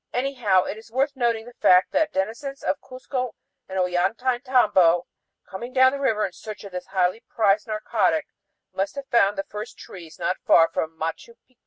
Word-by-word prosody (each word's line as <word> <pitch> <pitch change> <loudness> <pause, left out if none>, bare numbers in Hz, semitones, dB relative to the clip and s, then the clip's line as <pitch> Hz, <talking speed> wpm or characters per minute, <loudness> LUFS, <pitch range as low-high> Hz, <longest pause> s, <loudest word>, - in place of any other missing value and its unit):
Anyhow 245 -8 +2
it 215 - -5
is 225 0 -17
worth 270 +3 0
noting 235 -3 0
the 245 - -12
fact 180 -4 +4
that 315 0 +1
denizens 235 +8 -3
of - - -1
Cuzco 255 -1 -5 0.3
and 190 - -4
Ollantaytambo, 190 -1 +2 0.4
coming 240 +6 -8
down 260 0 +6
the 280 - -4
river 225 -6 +1
in 185 - -6
search 210 +2 -9
of 200 - -9
this 180 0 -6
highly 185 +2 +1
prized 210 0 +2
narcotic, 225 +8 0 0.5
must 195 +5 -2
have 280 -1 -6
found 205 -4 +3
the 195 - -1
first 210 +5 -8
trees 170 -4 -11
not 185 - -1
far 165 -1 +5
from 160 0 -3
Machu 165 +8 -5
Picchu. 255 -1 -36
220 Hz, 180 wpm, -24 LUFS, 190-255 Hz, 0.5 s, down